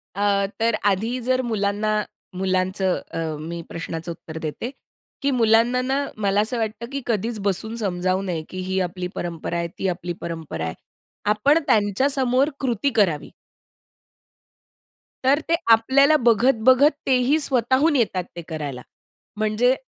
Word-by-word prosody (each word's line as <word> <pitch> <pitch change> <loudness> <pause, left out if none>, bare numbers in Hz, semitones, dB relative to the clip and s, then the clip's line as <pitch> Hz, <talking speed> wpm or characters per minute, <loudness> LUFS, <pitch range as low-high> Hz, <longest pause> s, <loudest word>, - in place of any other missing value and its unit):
अ, 200 -1 +2
तर 230 0 +2
आधी 220 +6 +1
जर 255 +2 +1
मुलांना 215 -2 0 0.4
मुलांचं 185 0 0
अ, - - -5 0.2
मी 170 +2 -5
प्रश्नाचं 165 0 -5
उत्तर 160 -1 -9
देते, 160 +10 -4 0.5
की 280 0 +1
मुलांना 235 +1 +3
ना 270 +2 0
मला 200 -1 +2
असं 230 +3 -2
वाटतं, 225 +1 -3
की 275 0 -3
कधीच 225 0 -1
बसून 220 +4 -2
समजावू 185 -3 0
नये, 175 -4 -3
की 185 - -6
ही 190 0 0
आपली 180 0 -3
परंपरा 170 0 -4
आहे. 170 0 -1
ती 195 - 0
आपली 175 -1 -3
परंपरा 160 - -5
आहे. 80 - -3 0.6
आपण 285 +9 +4
त्यांच्यासमोर 255 +6 +2
कृती 250 0 0
करावी. 175 -9 +1 1.9
तर 275 +3 +4
ते 335 - +4 0.2
आपल्याला 270 +7 +5
बघत-बघत, 255 +4 +5 0.2
तेही 260 +4 +3
स्वतःहून 265 +3 +2
येतात 195 -7 +1
ते 170 - -5
करायला. 145 -5 -5 0.6
म्हणजे 215 +4 +2
215 Hz, 135 wpm, -23 LUFS, 185-250 Hz, 1.9 s, आपल्याला